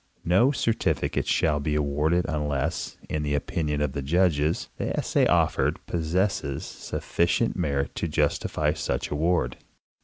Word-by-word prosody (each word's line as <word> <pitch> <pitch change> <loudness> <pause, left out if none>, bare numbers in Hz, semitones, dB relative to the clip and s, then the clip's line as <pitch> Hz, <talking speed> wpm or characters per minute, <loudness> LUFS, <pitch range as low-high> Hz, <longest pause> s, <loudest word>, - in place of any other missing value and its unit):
No 95 - +4
certificate 115 -5 0
shall 75 -2 +2
be 75 +1 -1
awarded 75 +4 +1
unless, 75 0 -2
in 75 - -2
the 75 -1 0
opinion 75 0 -1
of 75 -3 0
the 70 - -3
judges, 80 0 +1
the - - -2
essay - - +2
offered - - +2
possesses 85 -4 -1
sufficient 85 +7 -1
merit 70 -6 -1
to 85 - -1
justify 75 - 0
such - - -2
award. 75 -4 +1
75 Hz, 130 wpm, -26 LUFS, 75-85 Hz, -, No